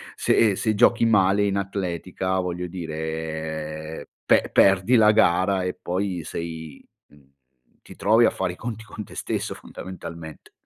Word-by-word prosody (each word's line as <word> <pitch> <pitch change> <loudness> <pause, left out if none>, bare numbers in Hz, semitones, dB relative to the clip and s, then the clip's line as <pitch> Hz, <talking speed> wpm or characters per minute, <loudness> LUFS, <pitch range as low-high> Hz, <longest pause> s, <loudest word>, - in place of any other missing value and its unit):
se 110 -4 +3
se 110 +2 0
giochi 115 +1 +4
male 100 -2 +3
in 100 -1 0
atletica, 95 -1 -2
voglio 90 0 -3
dire 80 -2 -5 0.2
pe - - +3
perdi 95 +5 +4
la 110 -2 +6
gara, 95 -2 +3
e 90 - -3
poi 90 -2 -2
sei 80 -2 -7 0.3
mhmm, 70 -2 -23 0.5
ti - - -14
trovi 110 +3 +4
a - - +4
fare 95 -2 -3
i - - -12
conti 115 +1 -6
con 105 -1 -8
te - - -14
stesso - - -3
fondamentalmente. 85 -3 -10
90 Hz, 145 wpm, -24 LUFS, 80-100 Hz, 0.5 s, la